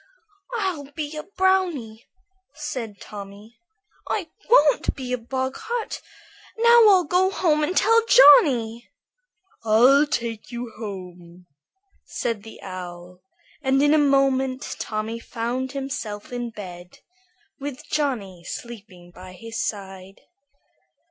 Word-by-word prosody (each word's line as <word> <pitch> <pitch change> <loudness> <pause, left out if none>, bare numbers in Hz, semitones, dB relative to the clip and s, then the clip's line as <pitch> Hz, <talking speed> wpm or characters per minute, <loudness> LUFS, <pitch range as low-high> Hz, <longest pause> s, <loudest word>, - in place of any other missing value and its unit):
"I'll 355 -10 -3
be 305 -1 -4
a 305 - -4
brownie," 355 - -1 0.5
said 250 -9 -6
Tommy. 205 +2 -11 0.5
"I 355 -7 -2 0.2
won't 300 - +4
be 255 -2 -5
a - - +1
boggart. 265 - -4 0.6
Now 470 0 +7
I'll 375 -3 +5
go 360 +4 +2
home 325 -6 +1
and 360 +5 -1
tell 455 +1 +4
Johnny." 250 - +6 0.7
"I'll 250 +7 +5
take 235 -6 -4
you 240 -1 -6
home," 180 -4 -9 0.6
said 230 -3 -3
the 225 +1 -12
Owl, 180 -1 -9 0.4
and 270 -1 +2
in 290 +1 +4
a 310 - +5
moment 270 -2 +1
Tommy 220 +1 -4
found 245 +3 -4
himself 260 -6 -5
in 240 -1 -3
bed, 180 -5 -10 0.6
with 275 -2 -7
Johnny 225 - -2
sleeping 200 -6 -9
by 185 +1 -12
his 230 +5 -5
side. 195 -2 -6
245 Hz, 115 wpm, -23 LUFS, 205-295 Hz, 0.7 s, Now